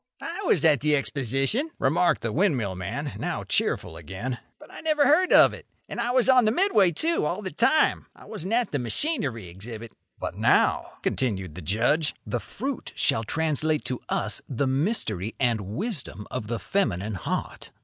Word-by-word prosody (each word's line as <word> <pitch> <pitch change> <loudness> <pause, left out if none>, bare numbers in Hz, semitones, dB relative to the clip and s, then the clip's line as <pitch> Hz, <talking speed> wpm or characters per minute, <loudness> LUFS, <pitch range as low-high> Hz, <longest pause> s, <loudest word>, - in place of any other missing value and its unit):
"I 345 +4 -6
was 165 - +3
at 150 -4 +6
the 150 +2 +4
Exposition," 140 - +2
remarked 155 +4 +1
the 115 - -1
windmill 135 - +1
man, 115 +11 -5
now - - -3
cheerful 80 - -1
again, 95 - -6 0.2
"but - - -16
I - - -10
never 305 -2 +2
heard 335 +7 +4
of - - +7
it. - - -11 0.2
And - - -4
I 235 - -1
was 250 0 +2
on 255 -3 +5
the 215 - +3
Midway, 240 - +3
too, 325 - +1
all 180 +7 -2
the 190 - -4
time 260 - +2
I - - -16
wasn't 205 -1 -4
at 240 0 +1
the 145 - -1
machinery 125 - 0
exhibit." 110 +5 -8 0.3
"But - - -4
now," - - +2
continued 95 - -2
the 90 - -9
Judge, 120 - +1
"the 120 - -2
fruit 265 - -6
shall 115 - +1
translate 155 +3 0
to 125 - -3
us - - -1
the 135 +1 -1
mystery 130 - 0
and 120 -4 +1
wisdom 130 - -3
of 105 - -4
the 115 +1 -2
feminine 110 - -1
heart. 95 - -4
145 Hz, 180 wpm, -25 LUFS, -, 0.3 s, of